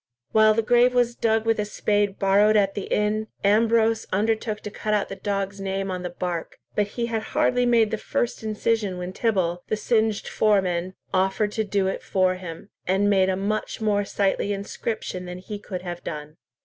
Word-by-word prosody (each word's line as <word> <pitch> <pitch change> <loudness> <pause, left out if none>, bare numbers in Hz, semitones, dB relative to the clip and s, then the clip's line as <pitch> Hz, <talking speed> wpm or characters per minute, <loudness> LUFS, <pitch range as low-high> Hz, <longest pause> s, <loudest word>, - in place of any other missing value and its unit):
While 215 0 +5
the 225 - +1
grave 245 +2 +4
was 240 -1 +3
dug 225 -1 +1
with 225 -1 +2
a - - +2
spade 205 -1 0
borrowed 205 +2 +4
at 195 -1 +2
the 200 - -4
inn, 215 +1 +1 0.2
Ambrose 225 +2 +3
undertook 215 +2 0
to 210 - -6
cut 215 0 -1
out 205 - -1
the 195 - -5
dog's 195 0 -3
name 195 0 -2
on 180 -1 -3
the 180 - -4
bark, 175 -1 -4 0.2
but 205 -1 +1
he 235 - +1
had 225 -2 -2 0.2
hardly 250 -5 +3
made 230 -3 +4
the 220 - -2
first 240 - -2
incision 215 -2 -1
when 180 +1 -5
Tibble, 185 -6 0
the 215 - -1
singed 220 -1 +1
foreman, 185 -4 +1 0.2
offered 190 +2 +1
to 220 - -1
do 200 -2 0
it 190 - -2
for 185 -1 +1
him, 180 +1 -8 0.2
and 195 +2 +2
made 190 -1 +4
a 190 - +1
much 210 +2 -2
more 210 -2 +1
sightly 200 0 0
inscription 200 -1 -4
than 180 0 -6
he 205 +3 -7
could 185 -3 -6
have 175 -1 -6
done. 150 0 -6
205 Hz, 195 wpm, -24 LUFS, 190-220 Hz, 0.2 s, While